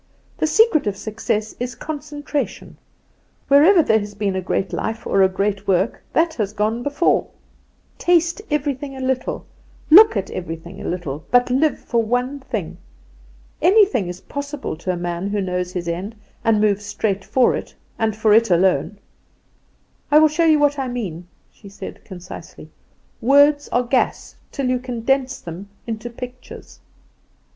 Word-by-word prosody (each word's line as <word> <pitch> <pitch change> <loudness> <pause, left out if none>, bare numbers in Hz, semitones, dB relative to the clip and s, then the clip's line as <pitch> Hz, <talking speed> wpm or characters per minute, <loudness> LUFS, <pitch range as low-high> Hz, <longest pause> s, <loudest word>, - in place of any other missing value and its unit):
The 315 - +2
secret 315 - +3
of 200 -1 -2
success 215 0 -3
is 250 +1 -4
concentration; 295 -1 -5 0.7
wherever 320 +6 +6
there 220 -5 +3
has 205 0 -7
been 200 -2 -1
a 190 - -1
great 190 +1 -2
life, 225 +1 -3
or 195 - +2
a 190 - +5
great 200 +1 -2
work, 190 +3 +1
that 330 0 +2
has 210 -7 -3
gone 215 +3 -1
before. 285 +6 +1 0.7
Taste 345 +2 +2
everything 285 -2 -2
a - - -7
little, 260 -1 -2 0.5
look 405 - +8
at 195 - -3
everything 170 +1 -7
a - - -7
little; 160 -4 -4
but 245 0 +3
live 290 +4 +2
for 235 -1 -1
one 245 +5 -1
thing. 265 - -5 0.8
Anything 385 - +4
is 180 +1 -7
possible 285 - -5
to 185 +3 -2
a 180 - -3
man 175 +2 -3
who 205 +1 -1
knows 180 -1 -2
his 175 -2 -4
end 185 +6 -4 0.3
and 225 -2 +3
moves 205 -1 +2
straight 205 -1 -2
for 255 +3 +2
it, - - -7 0.2
and 220 -2 0
for 215 -1 +3
it 225 0 +5
alone. 180 +1 +2 1.1
I 295 - +5
will 310 0 +6
show 330 +2 +1
you 315 -1 +5
what 290 -1 +2
I 265 - -2
mean," 185 -9 -5 0.2
she 200 - -15
said, 200 - -9
concisely; 180 -1 -10 0.5
"words 285 +4 +4
are 245 - +1
gas 250 +1 -1 0.2
till 275 -2 -2
you 255 0 +1
condense 255 +2 -1
them 175 +4 -9 0.2
into 225 0 -5
pictures." 250 +1 -10
230 Hz, 160 wpm, -21 LUFS, 195-285 Hz, 1.1 s, look